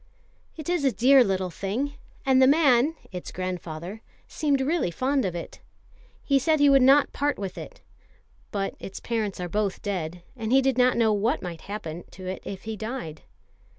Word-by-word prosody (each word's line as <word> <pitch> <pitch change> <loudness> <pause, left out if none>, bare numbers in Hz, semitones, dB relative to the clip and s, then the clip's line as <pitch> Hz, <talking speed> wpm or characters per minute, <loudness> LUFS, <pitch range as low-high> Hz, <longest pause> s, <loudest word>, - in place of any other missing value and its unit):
"It 310 - -7
is 350 -4 0
a 270 - +3
dear 260 +3 +6
little 190 -3 -1
thing, 225 +12 -3 0.3
and 265 -1 +4
the 260 - +7
man 285 0 +4 0.2
(its 180 -1 -7
grandfather) 180 +2 -5 0.3
seemed 285 -3 0
really 295 - +1
fond 265 +7 0
of 180 -2 -2
it. 170 - -7 0.6
He 275 -1 +3
said 310 +3 +2
he 285 -1 +6
would 275 -1 +6
not 275 +3 +5
part 290 0 0
with 195 -2 -5
it; - - -9 0.7
but 195 -1 -2
its 195 - -7
parents 220 -5 -2
are 180 - -3
both 205 +1 -2
dead, 175 -4 -4
and 225 -2 -4
he 265 - +6
did 270 -1 +2
not 250 0 +4
know 225 -2 +3
what 225 +8 0
might 170 -3 -6
happen 175 -5 -6
to 185 - -10
it 185 +1 -4
if 195 -1 -7
he 220 0 -4
died." 215 -7 -6
225 Hz, 185 wpm, -26 LUFS, 185-275 Hz, 0.7 s, the